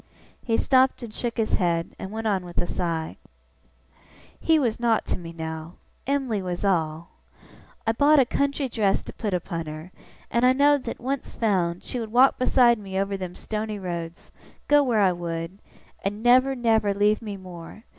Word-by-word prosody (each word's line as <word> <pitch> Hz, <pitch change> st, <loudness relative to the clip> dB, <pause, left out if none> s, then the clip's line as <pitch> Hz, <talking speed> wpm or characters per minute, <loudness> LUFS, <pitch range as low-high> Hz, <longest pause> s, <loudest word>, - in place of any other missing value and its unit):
He 225 Hz, -2 st, +1 dB
stopped 260 Hz, -1 st, +3 dB
and 225 Hz, -3 st, -8 dB
shook 235 Hz, 0 st, -3 dB
his 225 Hz, -1 st, +1 dB
head, 170 Hz, -3 st, -1 dB
and 190 Hz, -, -6 dB
went 220 Hz, +2 st, -5 dB
on 195 Hz, -4 st, +1 dB
with 175 Hz, -1 st, -11 dB
a -, -, +1 dB
sigh. 165 Hz, -3 st, -3 dB, 1.2 s
'He 325 Hz, -1 st, +3 dB
was 240 Hz, -7 st, 0 dB
nowt 235 Hz, -2 st, +2 dB
to -, -, -2 dB
me 165 Hz, -1 st, -8 dB
now. 160 Hz, 0 st, -6 dB, 0.3 s
Em'ly 265 Hz, -7 st, 0 dB
was 180 Hz, +1 st, -4 dB
all. 165 Hz, -3 st, 0 dB, 0.8 s
I 225 Hz, -, +3 dB
bought 290 Hz, +6 st, +4 dB
a 270 Hz, -, +6 dB
country 280 Hz, +2 st, -1 dB
dress 215 Hz, -5 st, 0 dB
to -, -, -9 dB
put 205 Hz, -4 st, -2 dB
upon 170 Hz, -2 st, -4 dB
her; 155 Hz, +4 st, -8 dB, 0.4 s
and 235 Hz, -, +1 dB
I 255 Hz, +1 st, +6 dB
know'd 285 Hz, 0 st, +3 dB
that, 230 Hz, -, -5 dB
once 265 Hz, +2 st, -4 dB
found, 180 Hz, -6 st, 0 dB
she 250 Hz, -, -4 dB
would 225 Hz, -2 st, -5 dB
walk 255 Hz, +3 st, +5 dB
beside 245 Hz, -2 st, +4 dB
me 190 Hz, -2 st, -6 dB
over 195 Hz, 0 st, -1 dB
them 185 Hz, -2 st, -6 dB
stony 215 Hz, 0 st, -4 dB
roads, 170 Hz, -3 st, -6 dB, 0.4 s
go 290 Hz, 0 st, +6 dB
where 240 Hz, -6 st, +2 dB
I 190 Hz, -2 st, +4 dB
would, 170 Hz, +1 st, -5 dB, 0.4 s
and 205 Hz, +2 st, -3 dB
never, 255 Hz, +2 st, +5 dB
never, 220 Hz, -4 st, +2 dB
leave 210 Hz, +2 st, +2 dB
me 210 Hz, -3 st, -6 dB
more. 185 Hz, +2 st, -11 dB
210 Hz, 185 wpm, -25 LUFS, 175-245 Hz, 1.2 s, a